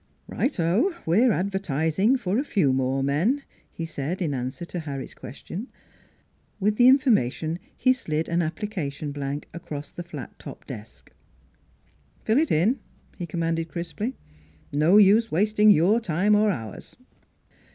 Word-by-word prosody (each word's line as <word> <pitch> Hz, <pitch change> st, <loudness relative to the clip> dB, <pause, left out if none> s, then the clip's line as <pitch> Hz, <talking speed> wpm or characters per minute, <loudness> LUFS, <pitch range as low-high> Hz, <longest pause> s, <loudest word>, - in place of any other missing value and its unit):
" -, -, -41 dB
Right 270 Hz, -7 st, -2 dB
o! 205 Hz, -, +2 dB
we're 220 Hz, +10 st, +4 dB
advertising 190 Hz, -, +1 dB
for 205 Hz, -2 st, -1 dB
a -, -, 0 dB
few 180 Hz, -, +2 dB
more 130 Hz, +1 st, 0 dB
men," 180 Hz, -, +1 dB, 0.3 s
he 165 Hz, -, -5 dB
said 160 Hz, +2 st, -4 dB
in 160 Hz, -6 st, -1 dB
answer 130 Hz, +6 st, -4 dB
to 175 Hz, -, -5 dB
Harry's 140 Hz, -4 st, -6 dB
question. 175 Hz, -, -8 dB, 0.9 s
With 210 Hz, +1 st, +1 dB
the 245 Hz, -, +6 dB
information 180 Hz, -, +3 dB, 0.2 s
he 255 Hz, -, +4 dB
slid 160 Hz, -10 st, -2 dB
an 170 Hz, +1 st, +1 dB
application 155 Hz, -4 st, -4 dB
blank 140 Hz, 0 st, -4 dB
across 150 Hz, -3 st, -7 dB
the -, -, -7 dB
flat 175 Hz, +1 st, -9 dB
top -, -, -10 dB
desk. -, -, -10 dB, 0.6 s
" -, -, -36 dB
Fill 225 Hz, +5 st, +3 dB
it 320 Hz, -, +1 dB
in," 210 Hz, -, +2 dB, 0.4 s
he 175 Hz, -, -4 dB
commanded 165 Hz, 0 st, -2 dB
crisply. 175 Hz, -, -4 dB, 0.3 s
" 80 Hz, -, -30 dB
No 155 Hz, +7 st, +5 dB
use 215 Hz, +3 st, +5 dB
wasting 210 Hz, +5 st, +3 dB
your 200 Hz, +4 st, +5 dB
time, 195 Hz, 0 st, +1 dB
or 210 Hz, +1 st, +4 dB
ours." 115 Hz, -, -6 dB
175 Hz, 150 wpm, -25 LUFS, 150-215 Hz, 0.9 s, the